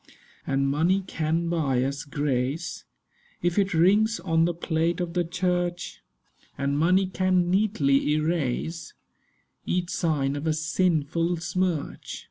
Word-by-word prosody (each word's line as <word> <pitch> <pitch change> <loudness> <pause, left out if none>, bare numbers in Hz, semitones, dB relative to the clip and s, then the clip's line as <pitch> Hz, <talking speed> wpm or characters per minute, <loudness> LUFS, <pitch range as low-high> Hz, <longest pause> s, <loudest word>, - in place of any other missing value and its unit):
'And 140 0 +1
money 165 +8 +2
can 165 -1 -1
buy 145 -7 +1
us 140 +3 -3
grace, 145 +2 -2 0.6
If 175 +3 +1
it 195 -3 +1
rings 205 +6 +3
on 165 -2 +2
the 175 - 0
plate 165 0 -1
of 175 -2 -3
the 175 0 +1
church: 175 0 -2 0.6
And 140 +1 -1
money 180 +6 +3
can 185 -1 +1
neatly 150 -9 +2
erase 155 0 -2 0.7
Each 180 -1 -1
sign 145 -4 0
of 145 +3 -4
a 155 - +2
sinful 165 +1 0
smirch. 175 -2 -2
165 Hz, 125 wpm, -26 LUFS, 150-180 Hz, 0.7 s, rings